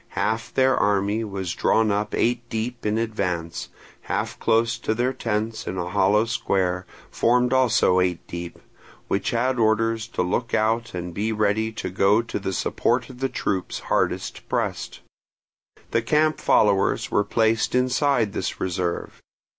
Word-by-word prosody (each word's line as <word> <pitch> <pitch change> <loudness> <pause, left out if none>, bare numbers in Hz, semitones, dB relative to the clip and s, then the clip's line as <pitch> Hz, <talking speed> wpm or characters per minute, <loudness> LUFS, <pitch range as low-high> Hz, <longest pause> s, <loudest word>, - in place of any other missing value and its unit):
Half 110 +2 -1
their 130 0 +4
army 105 +2 +1
was 95 -5 -4
drawn 110 +3 +2
up 105 +1 -1
eight 120 0 0
deep 115 +1 -3
in 105 +1 +1
advance, 90 -7 -2 0.4
half - - -2
close 115 +1 +2
to 110 - -1
their 125 +3 0
tents 110 -1 -3
in 95 - -3
a 90 -1 -3
hollow 105 +4 +3
square, 95 -5 -1 0.2
formed 125 +1 +2
also 120 -8 +4
eight 90 -2 0
deep, 85 0 -7 0.5
which 100 - 0
had 125 +2 0
orders 115 +1 +1
to 105 - -2
look 115 +6 -1
out 115 0 0
and 90 -1 -5
be 105 +5 -1
ready 110 +1 +1
to 100 - -5
go 100 +4 +3
to 115 - -4
the 95 -1 -3
support 120 +6 0
of 125 - -14
the 135 0 0
troops 95 -7 -2 0.2
hardest - - -1
pressed. - - -2 0.9
The 115 - +2
camp 155 +6 +2
followers 100 -2 +2
were 105 - +3
placed 110 +3 +1
inside 125 -3 +2
this - - -3
reserve. 90 -1 -3
110 Hz, 155 wpm, -24 LUFS, 95-115 Hz, 0.9 s, their